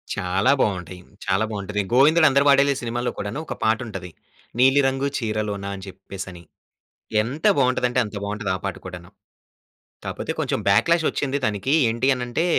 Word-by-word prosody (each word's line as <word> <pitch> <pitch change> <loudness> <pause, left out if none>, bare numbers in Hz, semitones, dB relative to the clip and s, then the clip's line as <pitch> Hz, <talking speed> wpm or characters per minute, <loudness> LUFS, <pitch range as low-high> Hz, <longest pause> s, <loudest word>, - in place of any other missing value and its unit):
చాలా 95 +8 +1
బాగుంటాయి. 90 -3 -2 0.2
చాలా 95 +3 +1
బాగుంటది. 105 0 -2
'గోవిందుడు 155 +5 +6
అందరివాడేలే' 140 0 +4
సినిమాల్లో 120 +1 -2
కూడాను 100 +8 -4
ఒక - - -5
పాట 110 0 +3
ఉంటది. 95 -4 -7 0.5
'నీలి 135 +3 +5
రంగు 135 +1 0
చీరలోన' 105 -3 -3
అని 95 0 -9
చెప్పేసని 95 -2 -9 0.8
ఎంత 130 +8 -5
బాగుంటదంటే, 125 -1 +2
అంత 105 - -9
బాగుంటది 105 0 -3
ఆ - - -3
పాట 95 - -2
కూడాను. 90 -2 -9 1.0
కాకపోతే, - - -4
కొంచెం - - -1
బ్యాక్‌లాష్ 165 +11 +3
వచ్చింది 140 0 -2
దానికి 105 +6 -1 0.2
ఏంటి 120 +4 0
అనంటే, 125 +6 -2
110 Hz, 145 wpm, -23 LUFS, 100-135 Hz, 1.0 s, గోవిందుడు